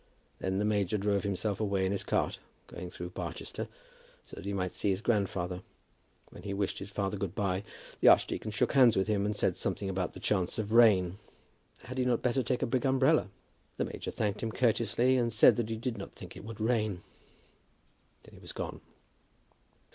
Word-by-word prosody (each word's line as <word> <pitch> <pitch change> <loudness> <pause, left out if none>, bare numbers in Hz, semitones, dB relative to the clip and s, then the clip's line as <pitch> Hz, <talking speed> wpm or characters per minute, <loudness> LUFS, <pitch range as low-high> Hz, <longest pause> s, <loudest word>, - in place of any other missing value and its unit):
And 95 - -1
then - - 0
the 105 - +1
major 105 -1 +1
drove 100 0 +1
himself 100 0 -1
away 100 -3 +1
in 95 - 0
his 100 - -1
cart, - - 0 0.3
going 90 0 -8
through 90 0 -7
Barchester, - - -5 0.6
so - - -11
that 85 - -9
he 100 - -2
might 90 -2 -1
see 100 - -1
his 95 -1 +1
grandfather. 95 -5 -1 0.7
When - - -11
he 100 -1 -4
wished 100 -1 -1
his 95 - -7
father 100 0 -2
good 95 -3 -4
by, 95 -2 0 0.4
the - - +4
archdeacon 110 - +4
shook 105 - 0
hands 125 -6 +6
with 95 - +2
him, 105 -1 +1
and 105 - -1
said - - +1
something 95 -1 -1
about 95 -1 -2
the - - -9
chance 95 -4 0
of 110 -1 -3
rain. 100 -5 +5 0.6
Had 130 +1 -6
he 125 - +2
not 125 -2 +1
better 125 +1 +2
take 125 +1 -1
the - - +2
big 125 +1 0
umbrella? 135 -1 +3 0.5
The - - 0
major - - -6
thanked 105 -1 -2
him 115 - -2
courteously, 120 +2 +2
and 120 -1 +1
said 110 - +7
that 115 -2 -1
he 110 - -2
did 115 -1 -3
not 100 - -8
think - - -10
it - - -10
would 110 -1 -8
rain. 110 -5 0 1.2
Then - - -17
he - - -13
was - - -9
gone. - - -5
105 Hz, 205 wpm, -31 LUFS, 95-115 Hz, 1.2 s, said